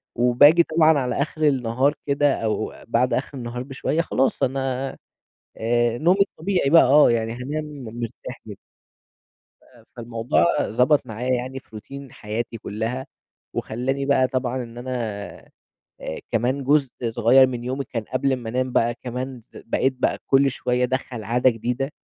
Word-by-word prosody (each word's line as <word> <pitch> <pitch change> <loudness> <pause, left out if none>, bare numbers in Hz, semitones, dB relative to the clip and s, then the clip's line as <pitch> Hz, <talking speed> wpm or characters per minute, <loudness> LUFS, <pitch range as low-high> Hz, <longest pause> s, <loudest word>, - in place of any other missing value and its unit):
وباجي 135 +8 +6
طبعًا 160 -1 +4
على 125 +1 -1
آخِر 155 +1 -3
النهار 130 +1 +1
كده 140 0 +3
أو 110 0 -1
بَعد 120 +1 +1
آخِر 135 +2 -2
النهار 120 0 -5
بشوية، 140 +4 -1
خلاص 135 -5 0
أنا 135 0 -1 0.7
آآ 120 +1 +1
نومي 180 +5 +3
الطبيعي 180 -5 0
بقى، 165 - +7
آه، 140 +1 +6
يعني 115 -1 0
هانام 140 +6 -4
م 130 -6 -9
مرتاح 115 0 -7
جدّا. - - -8 1.1
آآ - - -21
فالموضوع 115 +4 0 0.2
ضبَط 125 +5 +2
معايا 125 +4 -2
يعني 130 +2 -3
في - - -29
روتين 135 +5 -9
حياتي 115 +2 -5
كلّها 115 +5 -4 0.5
وخلّاني 135 +4 -2
بقى 130 -2 +3
طبعًا 130 -1 -2
إن 115 0 -11
أنا 130 +1 -6 1.1
آآ، 80 - -5
كمان 125 +4 0
جزء 140 -1 +3 0.2
صغيّر 120 +4 +5
من 120 -2 -5
يومي 130 +2 -3
كان 115 -3 -5
قبْل 135 +3 0
أمّا 120 -3 -3
أنام 130 +1 -1
بقى، 120 0 +2
كمان 125 +1 -6
ز - - -21
بقيت 130 +3 +1
بقى - - 0
كلّ 135 0 +4
شويّة 125 0 -1
أدخّل 125 -3 -3
عادة 125 +2 +3
جديدة 125 +5 -3
130 Hz, 155 wpm, -23 LUFS, 120-135 Hz, 1.1 s, بقى